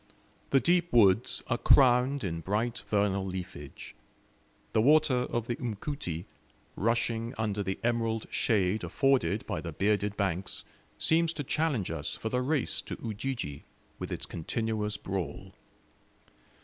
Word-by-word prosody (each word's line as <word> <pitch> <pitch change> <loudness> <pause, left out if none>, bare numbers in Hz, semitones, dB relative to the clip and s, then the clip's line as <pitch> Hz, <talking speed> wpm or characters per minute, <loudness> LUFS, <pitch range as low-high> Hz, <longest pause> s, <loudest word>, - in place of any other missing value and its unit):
The 135 - +5
deep 175 +3 +2
woods 110 -2 +4
are 120 - -1
crowned 130 +1 +5
in 85 -4 -2
bright 110 +7 -1
vernal 100 -2 +1
leafage; 90 -7 -7 0.8
the 110 - +4
water 140 -2 +4
of 120 -2 -1
the 120 0 -2
Mkuti, 105 - -4 0.5
rushing 115 +2 0
under 105 -2 -1
the 95 -1 -2
emerald 115 -2 0
shade 105 -2 +1
afforded 105 +1 +1
by - - -3
the 85 - -5
bearded 100 +4 0
banks, 95 -2 -1 0.3
seems 165 +1 +2
to 150 - -4
challenge 140 - 0
us - - -3
for 110 - -4
the 125 +2 0
race 140 +1 0
to - - -6
Ujiji, 110 - -4 0.4
with - - -5
its - - -3
continuous 105 +4 -2
brawl. 95 -8 -5
110 Hz, 135 wpm, -30 LUFS, 95-125 Hz, 0.8 s, The